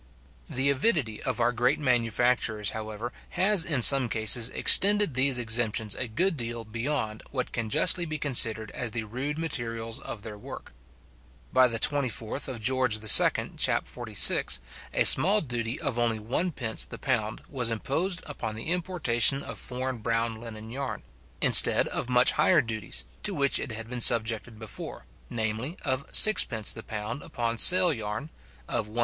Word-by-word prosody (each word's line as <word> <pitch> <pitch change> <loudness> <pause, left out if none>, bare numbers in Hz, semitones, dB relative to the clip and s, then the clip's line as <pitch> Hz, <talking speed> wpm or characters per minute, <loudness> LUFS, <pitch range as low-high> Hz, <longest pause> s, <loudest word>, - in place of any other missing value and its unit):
The 135 +2 -1
avidity 140 - -2
of 125 -2 -5
our 120 +1 +1
great 125 +4 -1
manufacturers, 120 -4 -1
however, 110 +2 -8 0.2
has 190 0 +3
in 145 -8 0
some 135 -2 +8
cases 110 +2 +4
extended 205 -4 +5
these 130 0 +2
exemptions 115 -2 -1
a 125 - -5
good 165 - -1
deal 120 -3 -5
beyond 115 -1 -5
what 130 -2 -5
can 115 -2 -5
justly 175 +10 +3
be 155 -1 -5
considered 115 -6 +1
as 120 - -5
the 115 +1 -5
rude 130 +7 -6
materials 115 -8 -4
of 105 - -10
their 105 -2 -10
work. - - -12 0.8
By 130 0 +4
the 115 -1 -4
24th 130 -1 -3
Geo. 115 -3 +4
II. - - -15
chap. - - 0
46, - - +2 0.3
a - - +1
small 205 +3 +6
duty 120 - -5
of 120 - -4
only 115 -2 -1
1d. 120 +1 -3
the - - -9
pound 110 -5 -4
was 125 -5 -2
imposed 165 - -4
upon 140 -7 -7
the 115 +9 -5
importation 145 -8 0
of - - -8
foreign 130 -1 -5
brown 115 0 -4
linen 110 -1 -10
yarn, 135 +1 -7 0.4
instead - - +7
of 125 - -5
much 125 0 +3
higher 155 +2 +1
duties, 110 - -5 0.2
to - - -4
which 140 -1 -1
it 140 - -7
had 115 +1 -8
been 125 0 -7
subjected 115 0 +1
before, 110 -1 -10 0.2
viz. 115 +7 -4
of 130 0 -3
6d. 115 - +4
the 110 - -10
pound 110 +5 -7
upon 115 -1 -5
sail 180 -2 +7
yarn, 110 +5 -7 0.4
of 105 - -3
1s. 110 +3 -8
120 Hz, 160 wpm, -25 LUFS, 110-140 Hz, 0.8 s, some